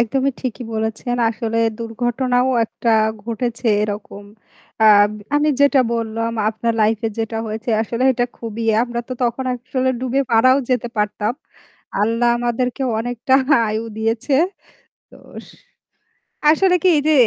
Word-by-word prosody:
একদমই 270 +4 +1
ঠিকই 250 -1 -4
বলেছেন। 220 +2 -2
আসলে 225 0 -3 0.2
দুর্ঘটনাও 245 +2 0
একটা 230 +1 -2 0.3
ঘটেছে 235 +1 -3 0.2
এরকম। 205 -1 -5 0.6
আ - - +6 0.5
আমি 295 +1 +2
যেটা 285 -1 +5
বললাম 230 0 -2 0.2
আপনার 225 +1 -1
life-এ 220 +1 +1
যেটা 225 0 -2
হয়েছে 220 +3 -4
আসলে 230 +2 -3
এটা 245 -1 0
খুবই 230 0 -5 0.2
আমরা 240 -1 -3
তো - - -4
তখন 240 +2 -1
আসলে 255 +1 -2
ডুবে 260 +1 0
মারাও 255 +4 +5
যেতে 245 -1 0
পারতাম। 210 +1 -1 0.7
আল্লাহ 230 +3 +2
আমাদেরকে 245 +2 -1 0.2
অনেকটা 245 +2 -1 0.3
আয়ু 215 +1 -2
দিয়েছে। 225 +5 -1 0.8
তোস - - -13 1.0
আসলে 360 +4 +4
কি - - +4
এই - - +2
যে 310 - +4
235 Hz, 130 wpm, -19 LUFS, 225-255 Hz, 1.0 s, আ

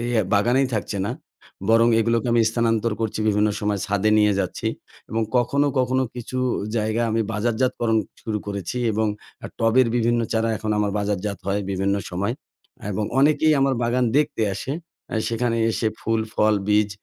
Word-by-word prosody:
এই 120 - -2 0.3
বাগানেই 120 +7 +3
থাকছে 105 -1 -2
না। - - -2 0.6
বরং 115 +1 +5
এগুলোকে 115 +1 +1
আমি 120 - +4
স্থানান্তর 115 -1 +1
করছি 110 -2 -2
বিভিন্ন 105 +1 +3
সময় 105 -1 0
ছাদে 100 +1 +1
নিয়ে 105 -1 +4
যাচ্ছি। - - -3 0.4
এবং 115 +1 0
কখনো, 140 +4 +2
কখনো 130 +1 +2
কিছু 125 +1 -5 0.4
জায়গায় 110 +2 0
আমি 115 - +1
বাজারজাতকরণ 115 +1 +1 0.2
শুরু 110 -1 -2
করেছি 100 +2 -4 0.2
এবং 110 +1 +1 0.5
টবের 115 +3 +4
বিভিন্ন 120 0 +2
চারা 115 0 +1
এখন 110 0 -4
আমার 105 -1 +1
বাজারজাত 100 0 -2
হয় 100 +1 0
বিভিন্ন 95 +1 0 0.2
সময় 100 +5 -1 0.6
এবং 105 +2 -1
অনেকেই 150 +2 +4
আমার 135 -1 +3
বাগান 120 +2 +1
দেখতে 150 -6 +1
আসে। 125 +7 -4 0.4
আ - - -2
সেখানে 115 0 0
এসে 110 0 0
ফুল 115 0 0
ফল 110 0 +3
বীজ 105 0 +3
115 Hz, 160 wpm, -23 LUFS, 105-120 Hz, 0.6 s, বরং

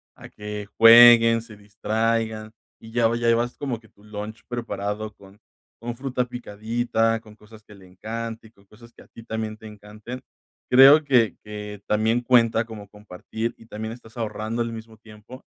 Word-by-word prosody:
a - - -13
que 105 -1 -8
jueguen, 115 0 +8
se 110 -2 -14
distraigan 110 +1 -2 0.3
y 110 - -13
ya, 115 -1 +2
lo 115 - -1
llevas 120 +1 0
como 135 -6 -4
que 110 -1 -22
tu 100 - -25
lunch 105 +1 -8
preparado 105 -3 -5
con 100 +1 -18 0.4
con 120 0 -5
fruta 130 -1 -2
picadita, 115 0 -2
con 105 -1 -17
cosas 110 0 -17
que 105 - -16
le 95 -2 -17
encanten, 110 +3 -7
con 100 -3 -26
cosas 115 +4 -18
que - - -17
a - - -23
ti 115 - -14
también 110 -1 -5
te 110 - -12
encanten. 105 +4 -10 0.5
Creo 135 +4 +8
que 125 -6 +2
que 105 -1 -8
también 110 +3 +1
cuenta 115 -2 +3
como 105 -3 -11
compartir 105 +3 -6
y 115 - -18
también 110 +1 -6
estás 110 -1 -16
ahorrando 110 +1 -3
al 115 - -5
mismo 110 0 -11
tiempo, 110 +4 -15
110 Hz, 175 wpm, -23 LUFS, 105-115 Hz, 0.5 s, jueguen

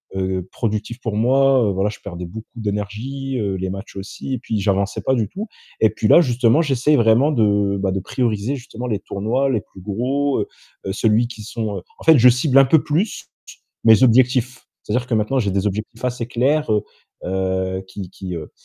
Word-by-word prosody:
heu, 95 -1 -2
productif 115 +2 -3
pour 115 -3 -3
moi. 130 +2 +4
Heu, - - +1
voilà, 95 +2 0
je 105 - -8
perdais 90 -3 -6
beaucoup 110 +6 -9
d'énergie, 115 +5 -4
heu, 100 -2 -1
les 95 0 -3
matchs 95 +2 -8
aussi 100 +7 -6
et 125 - -6
puis 110 -3 -3
j'avançais 100 0 0
pas 130 - +1
du 110 -4 0
tout, 205 - -6 0.3
et - - +6
puis - - -1
là, 175 - +7
justement, 125 +1 +3
j'essaie 145 -1 +2
vraiment 120 +4 +4
de, 105 -5 +2
bah, 95 -1 0
de 95 - -1
prioriser 110 +4 -1
justement 125 -2 -8
les 105 -4 -1
tournois 110 +8 -1
les 115 -6 0
plus 95 - -16
gros, 130 +8 -1
heu, - - -3 0.4
celui 110 +3 +2
qui 115 -3 -10
sont 110 -2 -4
heu, - - -6 0.2
en - - -12
fait, 160 -2 +7
je 125 +2 +8
cible 130 +3 +2
un 135 - +7
peu 150 +3 +4
plus 175 +9 -1 0.6
mes 110 -2 +7
objectifs. 125 +1 +3 0.2
C'est-à-dire 125 0 -1
que 125 - -2
maintenant 110 +5 0
j'ai 100 -5 0
des 100 +2 0
objectifs 110 +4 -5
assez 125 -2 -3
clairs, 135 +4 +1
heu 105 -1 +1 0.4
heu, 95 0 -1
qui 95 -1 -8
qui 95 -1 -7
heu 80 -2 -7
110 Hz, 205 wpm, -20 LUFS, 100-130 Hz, 0.6 s, je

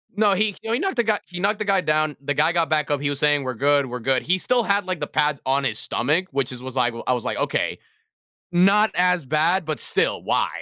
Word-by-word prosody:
No 205 -1 +3
he 205 +1 0
you 225 - -6
know, - - 0
he 235 - +1
knocked 385 -2 -2
the 240 - +2
guy 215 -2 0
he 180 0 -8
knocked 205 +3 0
the 215 - -2
guy 195 -2 +2
down, 155 -1 0
the 145 +1 -2
guy 155 +3 +2
got 170 -2 +1
back 150 -2 0
up, 145 -1 0
he 145 - -1
was 140 -1 -3
saying, 145 -1 +2
"We're 130 - -3
good, 140 +4 +2
we're 125 -1 -6
good." 130 +2 0
He 185 +2 +1
still 245 +5 +2
had, 200 -2 +1
like, 185 -3 -3
the 150 - -3
pads 150 -1 0
on 135 +1 +1
his 115 -5 -1
stomach, 155 +13 0
which 135 -1 -2
is 125 0 -8
was 130 0 -7
like 120 -2 +1
well 115 - -8
I - - +3
was 125 -2 -3
like, - - -3
"Okay, - - -1 0.7
not 195 +5 +4
as 180 -2 +2
bad, 160 +6 +1
but 155 -2 -3
still, - - +1
why?" - - 0
155 Hz, 275 wpm, -22 LUFS, 140-195 Hz, 0.7 s, not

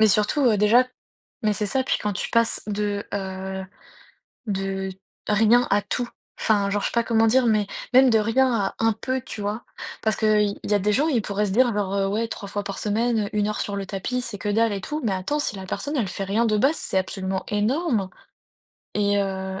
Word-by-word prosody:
Mais 220 - +6
surtout, 210 +8 +2
heu, 215 -3 +4
déjà 225 +5 +5 0.6
mais 210 - +3
c'est 210 +1 -1
ça, 260 +6 +1
puis - - 0
quand 210 -1 -1
tu - - -2
passes 230 0 +2
de, 205 0 -2
heu, 190 -1 -4 0.8
de 195 -1 -2 0.4
rien 225 +4 +4
à 205 +1 +3
tout 245 +3 -2 0.3
enfin, 200 -2 +2
genre 205 0 0
je - - 0
sais - - -9
pas 235 0 +1
comment 225 -1 +3
dire, 255 +1 +4
mais 215 -2 +2 0.3
même 260 -1 +7
de 225 - +4
rien 245 +4 +2
à 200 -3 0
un 225 0 +3
peu, 260 +4 -2
tu 215 - -8
vois? 210 +3 -3 0.4
Parce 220 -1 +1
qu'il 210 -2 +2
y 210 - +1
a - - +4
des 210 +2 +1
gens, 285 +8 +2
ils 250 -8 +1
pourraient 205 0 -1
se 190 - -2
dire 245 +4 +4
genre, 200 -2 -1
heu: 195 -1 +1
«Ouais, 220 +3 0
3 200 -3 -7
fois 205 0 -3
par 200 -1 -5
semaine, 220 0 0
1 210 -1 +1
heure 215 - -2
sur 200 -1 -2
le 195 - -4
tapis, 210 +6 -3
c'est 235 -4 -4
que 205 - -4
dalle 225 +1 +2
et 200 - -3
tout», 300 +10 -4
mais 205 - +1
attends, 190 +11 -1
si 215 - -1
la 190 - -7
personne, 290 +10 -3
elle 225 -7 0
fait 195 +2 -4
rien 210 +4 +1
de 215 -1 +2
base, 275 +9 +3
c'est 190 - +1
absolument 190 0 -3
énorme 215 - 0 0.8
et 205 -1 +2
heu 190 -1 -3
210 Hz, 230 wpm, -24 LUFS, 200-230 Hz, 0.8 s, même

